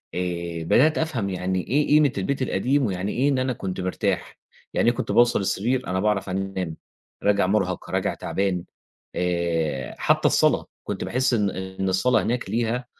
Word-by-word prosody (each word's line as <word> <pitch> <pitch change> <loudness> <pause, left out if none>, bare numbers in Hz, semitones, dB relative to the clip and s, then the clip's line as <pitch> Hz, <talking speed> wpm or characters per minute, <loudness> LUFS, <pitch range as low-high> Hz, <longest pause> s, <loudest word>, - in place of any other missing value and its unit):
آآ 85 -2 -3
بدَأت 150 - +4
أفهم 130 -11 -1
يعني 95 0 -2
إيه 145 +4 +2
قيمة 150 -2 +5
البيت 135 +9 -1
القديم، 130 +4 +1
ويعني 95 -1 -2
إيه 135 +4 +1
إن 135 -2 +1
أنا 130 0 0
كنت 95 -3 -4
مرتاح. 90 0 -2 0.4
يعني 120 - +3
إيه 120 - 0
كنت - - -3
باوصل 120 -1 +4
السِرير 120 +7 0
أنا 95 0 -1
باعرف 105 -1 0
أنام، 95 -3 -3 0.5
راجع 100 -2 +3
مُرهَق 100 +1 0
راجع - - 0
تَعبان، 95 -3 -2 0.5
آآ، 85 -6 -1
حتّى - - +3
الصَّلاة - - +3 0.2
كنت - - -4
باحس 130 0 +1
إن 105 -3 +2
إن 95 0 -4
الصَّلاة 120 +7 +2
هناك 120 +1 -2
ليها 120 +2 -1
100 Hz, 165 wpm, -24 LUFS, 90-125 Hz, 0.5 s, قيمة